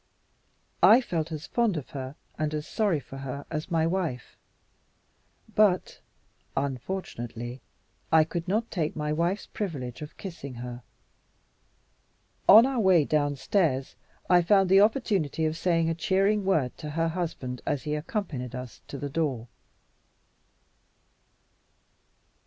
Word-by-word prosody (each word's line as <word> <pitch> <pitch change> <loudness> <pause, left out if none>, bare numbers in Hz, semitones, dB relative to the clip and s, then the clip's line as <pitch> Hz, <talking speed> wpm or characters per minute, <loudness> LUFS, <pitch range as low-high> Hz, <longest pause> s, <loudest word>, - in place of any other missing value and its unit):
I 230 - +8
felt 170 -10 -3
as 155 -1 -5
fond 230 -7 +1
of 145 - -7
her 135 0 -6 0.2
and 155 0 -2
as 150 0 -3
sorry 205 -7 +1
for 135 0 -11
her 135 +1 -6
as 155 +1 -3
my 165 -2 +2
wife. 165 -8 -2 1.2
But 200 -4 +2 0.6
(unfortunately) 125 - -4 0.5
I 160 -1 +7
could 170 +2 -4
not 220 +5 0
take 160 -5 -1
my 150 0 -1
wife's 175 +6 0
privilege 145 - -5
of 150 - -9
kissing 150 -9 -7
her. 120 0 -7 1.7
On 220 +4 +10
our 265 -2 0
way 185 -7 +5
downstairs, 145 0 0 0.3
I 180 -1 +6
found 195 +2 +4
the 195 +1 +7
opportunity 200 - +1
of 155 0 0
saying 165 -1 +1
a 165 - +1
cheering 195 +4 +1
word 155 -10 +1
to 150 - -6
her 165 +2 0
husband 160 -7 -4
as 140 - -1
he 150 -1 -2
accompanied 150 - -3
us 125 -4 -8
to 140 - -6
the 145 - -4
door. 135 -6 -2
160 Hz, 130 wpm, -27 LUFS, 135-190 Hz, 1.7 s, On